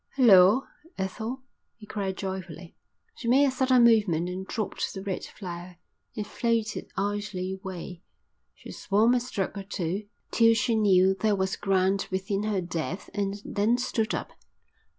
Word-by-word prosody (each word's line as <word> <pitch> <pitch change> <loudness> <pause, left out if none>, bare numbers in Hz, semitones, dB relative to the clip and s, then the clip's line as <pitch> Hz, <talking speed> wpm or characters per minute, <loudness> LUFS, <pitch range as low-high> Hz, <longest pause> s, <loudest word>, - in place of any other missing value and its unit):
"Hulloa, 215 -1 +6 0.3
Ethel," 220 +7 -4 0.3
he 220 - -12
cried 195 -3 -3
joyfully. 185 -3 -6 0.4
She 235 - -6
made 265 +4 +5
a 275 - +2
sudden 255 -1 +3
movement 205 -8 +3
and 185 +1 -5
dropped 215 -3 -3
the 190 - -6
red 195 -2 -3
flower. 175 -2 -8 0.4
It 210 -3 -3
floated 230 -1 -1
idly 200 -2 -2
away. 180 -2 -7 0.5
She - - -11
swam 220 +4 +2
a 250 - +3
stroke 230 -6 -3
or - - -6
two 195 +1 -3 0.2
till 230 -1 +5
she 230 +1 +1
knew 190 -3 +4
there 210 +2 +1
was 190 0 -1
ground 195 0 +1
within 195 +2 -2
her 205 -3 0
depth 170 +2 -4
and 200 0 -2
then 215 +4 +1
stood 240 -3 -1
up. - - -5
200 Hz, 150 wpm, -27 LUFS, 185-225 Hz, 0.5 s, Hulloa